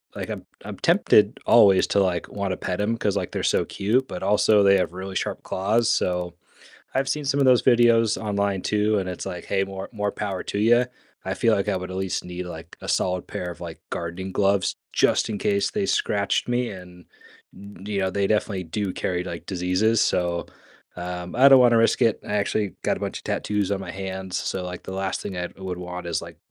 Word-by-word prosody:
like, - - -5
I'm - - -6 0.2
I'm - - -7
tempted - - +4
always 95 -2 +6
to, - - +2
like, 90 -3 0
wanna 100 -2 -2
pet 90 +2 -3
'em 115 +3 0
'cause, 105 -3 0
like, - - -3
they're - - -3
so - - +1
cute, 120 +7 0
but 90 - -6
also 105 +1 +4
they 100 0 +6
have 90 -2 -1
really 95 +1 -6
sharp - - -3
claws, 105 +5 +1
so 90 -1 0 0.6
I've 135 +1 +1
seen 150 +1 -1
some 140 +1 +1
of 135 - +4
those 125 -2 +5
videos 115 -3 +4
online 100 -2 -1
too, 105 0 +1
and, 95 - -2
it's 90 - -5
like, 90 - -5
"Hey, 95 -1 +1
more 95 0 -7
more 105 -1 -2
power 100 -3 -3
to - - -3
you." 120 +4 +4 0.4
I - - -1
feel - - +3
like - - -1
I - - +1
would 90 0 -5
at 95 - -5
least 95 -1 -2
need, 90 0 -6
like, 80 -1 -9
a - - -7
solid 90 0 0
pair 90 - -5
of, 85 - -9
like, 85 -2 -8
gardening 85 +3 -4
gloves 100 -1 +1 0.2
just - - +2
in 105 - -3
case 200 - +1
they 205 -2 -1
scratched 100 - 0
me, 120 0 0
and 90 -2 -11 0.5
yo 100 -2 -13
you 105 -1 -2
know, 95 -1 0
they 100 +1 0
definitely 100 -3 0
do 95 +3 -3
carry, 90 0 -2
like, 85 -2 -7
diseases, 95 +4 +1
so, 85 -1 0 0.5
um, 90 0 -5
I 135 +2 +8
don't 135 - +8
wanna 120 -2 +5
risk 115 +3 +3
it. 115 -3 +2
I 105 - -3
actually 100 -1 -1
got - - +1
a - - -8
bunch - - -3
of - - -16
tattoos 105 -2 -1
on 100 - -1
my - - -6
hands, 95 -1 -5
so, 95 - -2
like, 90 0 -6
the - - -6
last 95 0 -2
thing 95 - -5
I 90 0 -2
would 95 -2 -5
want 90 0 -6
is, 85 - -1
like, - - -10
95 Hz, 225 wpm, -24 LUFS, 90-105 Hz, 0.6 s, I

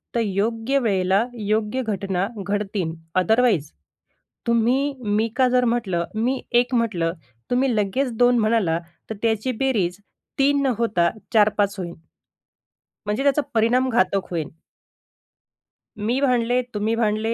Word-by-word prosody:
तर - - +2
योग्य 225 +6 0
वेळेला 195 -2 +2
योग्य 215 +4 0
घटना 195 -3 -1 0.2
घडतील. 200 -4 -2 0.2
अदरवाईज 215 - +2 0.8
तुम्ही, 245 +5 +2
मी 210 +2 +1
का 260 0 +4
जर 250 0 +3
म्हटलं, 210 -8 0
मी 250 +4 0 0.2
एक 245 +1 -6
म्हटलं. 185 -8 0 0.4
तुम्ही 250 -1 +1
लगेच 215 +6 0
2 245 +1 +4
म्हणाला. 215 -7 +2 0.3
तर 220 - -4
त्याची 225 +2 +1
बेरीज 205 -10 0 0.4
3 280 +1 +3
न 275 - +1
होता 205 -7 +2 0.2
4-5 205 -2 +3
होईन. 170 -2 -5 1.1
म्हणजे 210 +5 -1
त्याचा 280 +1 +3
परिणाम 240 +4 +3
घातक 195 -4 +1
होईल. 165 -4 -2 1.5
मी 225 +5 0
भांडले, 250 -2 +2
तुम्ही 215 +2 0
भांडले. 220 0 0
220 Hz, 125 wpm, -22 LUFS, 200-245 Hz, 1.5 s, का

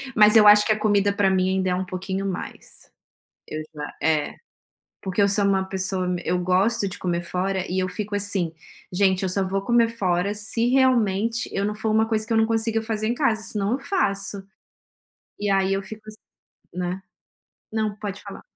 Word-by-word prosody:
mas 210 +1 +7
eu 210 -1 +8
acho 210 0 +7
que 215 - +1
a 215 - +1
comida 205 -1 +2
para 200 -1 +2
mim 185 0 +1
ainda 190 0 0
é 180 - +1
um 185 +1 -2
pouquinho 190 +2 -4
mais, 190 -2 -7 0.6
eu 155 0 -5
já 150 -1 -7
é 155 -1 +1 0.7
porque 190 +1 -2
eu 200 - +4
sou 200 +1 +2
uma 195 -1 +2
pessoa 190 -1 -2
me 180 -1 -2
eu 180 - 0
gosto 190 +4 +1
de 185 - -7
comer 175 -1 -2
fora 185 +1 -2
e 190 - -1
eu 185 - -1
fico 210 +1 -5
assim: 195 -5 0 0.4
"Gente, 190 0 +2
eu - - 0
só 195 +1 0
vou 195 +1 -2
comer 235 +2 +3
fora 190 -3 0
se 220 +3 0
realmente 235 -4 +2
eu 195 - -1
não 210 0 -1
for 220 +1 -2
uma 220 +1 +3
coisa 215 -1 0
que 230 - -3
eu - - +2
não 220 0 +4
consiga 225 0 0
fazer 220 -1 -2
em 240 - 0
casa, 220 -6 0
senão 210 -1 -2
eu 255 - 0
faço." 200 - -1 1.0
E 205 -1 -1
aí 195 0 +2
eu 195 - -1
fico 215 +2 -10
assim, 215 0 -10 0.6
né 180 +1 -3 0.7
não, 215 -2 -1
pode 200 -2 -6
falar. - - -10
200 Hz, 205 wpm, -23 LUFS, 190-215 Hz, 1.0 s, eu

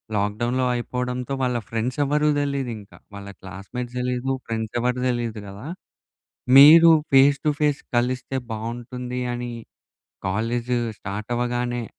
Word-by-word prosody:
Lock 105 0 0
డౌన్‌‌లో 125 +2 +1
అయిపోవడంతో 125 +1 -3
వాళ్ళ 125 -1 +1
friends 115 +4 -2
ఎవ్వరూ 150 +2 +2
తెలీదింకా 130 -7 -4 0.2
వాళ్ళ 100 0 -9
క్లాస్‌మేట్స్ 110 +7 -7
తెలీదు 125 +1 -1 0.2
ఫ్రెండ్స్ 110 -1 -4
ఎవరు 125 +1 0
తెలీదు 120 -3 -2
కదా! 100 +7 -9 0.9
మీరు 160 +4 +10 0.2
ఫేస్ 140 +1 +6
టు - - +4
ఫేస్ 150 -1 +1 0.2
కలిస్తే 125 +2 -1
బావుంటుంది 120 +3 -5
అని 120 0 -4 0.8
కాలేజ్ 115 +5 -1 0.3
స్టార్ట్ 105 +3 -6
అవ్వగానే 120 0 -1
120 Hz, 120 wpm, -23 LUFS, 115-130 Hz, 0.9 s, మీరు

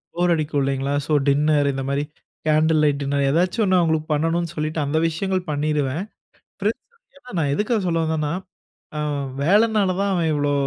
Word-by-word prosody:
போர் 175 0 +2
அடிக்கும் 150 -3 -1
இல்லீங்களா? 135 +1 -1
So 155 - -1
dinner 145 +1 +3
இந்த 135 - -3
மாதிரி 140 +1 0 0.4
கேண்டில் 155 0 +3
லைட் 145 -1 +2
டின்னர் 140 0 0
ஏதாச்சும் 180 - +1
1 185 -1 +3
அவுங்களுக்கு 160 -2 +1
பண்ணனும்னு 165 +2 0
சொல்லிட்டு 155 +1 -2
அந்த 150 +3 -1
விஷயங்கள் 185 +3 -1
பண்ணிருவேன். 150 +2 -1 0.6
பிரண்ட்ஸ்ன்னு 280 - -6
நான் 145 -3 +1
எதுக்காக 215 +3 0
சொல்ல 165 -1 +1
வந்தேன்னா, 155 -1 -1 0.7
அ - - -2 0.4
வேலைனால 205 +1 +3
தான் 200 0 +1
அவன் 170 -3 +1
இவ்ளோ 145 -1 0
155 Hz, 160 wpm, -22 LUFS, 145-180 Hz, 0.7 s, டின்னர்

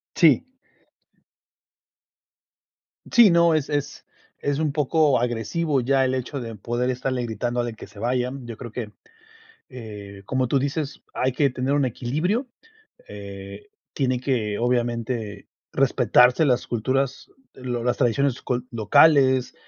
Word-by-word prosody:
Sí. 165 - +5 2.7
Sí, 230 -6 +7
no, 170 -1 +4
es 155 -3 0
es 145 -1 -3 0.3
es 145 +1 -1
un 155 -2 0
poco 150 -1 +2
agresivo 125 +6 -1
ya 135 +2 +2
el 130 0 0
hecho 130 +2 -4
de 115 -2 -6
poder 120 +4 -2
estarle 125 0 -2
gritando 120 +2 -2
de 120 -2 -4
que 110 - -11
se 100 0 -15
vayan. 125 +2 -2
Yo 115 -2 -7
creo 120 -3 -8
que, 110 -4 -5 0.8
eh, 105 -6 -10
como 130 +2 0
tú 140 - +2
dices, 140 +2 -3
hay 130 0 0
que 140 0 +2
tener 130 +2 -2
un 145 -2 +2
equilibrio. 155 - -1 0.6
Eh, 100 - -9 0.2
tiene 130 -3 0
que, 115 -6 -1
obviamente, 120 -3 -2 0.2
respetarse 125 +5 +4
las 125 -4 +1
culturas, 130 +3 -2 0.2
lo 125 -2 -4
las 125 - +1
tradiciones 130 +1 +1
cul 125 0 -2
locales, 130 +3 +4
125 Hz, 135 wpm, -23 LUFS, 120-140 Hz, 2.7 s, Sí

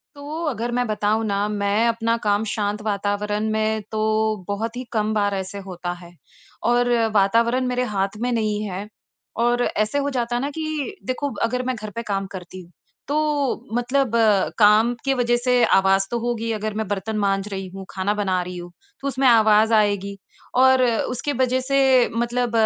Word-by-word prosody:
तो 285 - -11 0.2
अगर, 240 -5 -2
मैं 245 +1 0
बताऊँ 215 +1 0
न 200 0 0
मैं 205 +2 +1
अपना 230 0 +1
काम 205 0 +2
शांत 210 0 -2
वातावरण 210 +1 -1
में 220 0 0
तो 215 -1 -2 0.5
बहुत 220 +3 -3
ही 250 - -4
कम 215 -1 0
बार 205 -1 +1
ऐसे 190 +1 -5
होता 175 -1 -4
है। 175 -1 -13 0.6
और 245 0 +2 0.3
वातावरण 230 +5 +3
मेरे 250 0 0
हाथ 195 +1 -1
में 245 +1 0
नहीं 215 -3 0
है 195 +3 -5 0.6
और 240 +1 +2
ऐसे 215 +5 0
हो 285 0 -1
जाता 240 0 -1
ना 275 +3 -2
कि 310 +3 -3
देखो 275 +2 -2
अगर 250 +2 0
मैं 255 0 -1
घर 215 -2 -7
पे 230 - -2
काम 195 -1 -1
करती 185 0 -8
हूँ 175 -1 -17 0.4
तो 295 -4 -1
मतलब 250 +1 +1 0.5
काम 215 +2 +5
की 270 - +2
वजह 240 -2 +1
से 245 0 +2
आवाज़ 195 0 +3
तो 240 - 0
होगी 230 -1 -2
अगर 215 0 -3
मैं 215 0 -3
बर्तन 205 +2 -3
माँज 195 -1 0
रही 190 -1 -4
हूँ, 190 +1 -9
खाना 195 +2 -1
बना 190 -3 0
रही 180 0 -7
हूँ 175 0 -8 0.3
तो 280 - -3
उसमें 270 0 +1
आवाज़ 220 -1 +5
आएगी। 200 -2 +1 0.4
और 260 0 +6
उसके 250 +4 -1
वजह 255 0 +2
से 265 -2 +4
मतलब 240 +1 0
220 Hz, 180 wpm, -22 LUFS, 205-245 Hz, 0.6 s, और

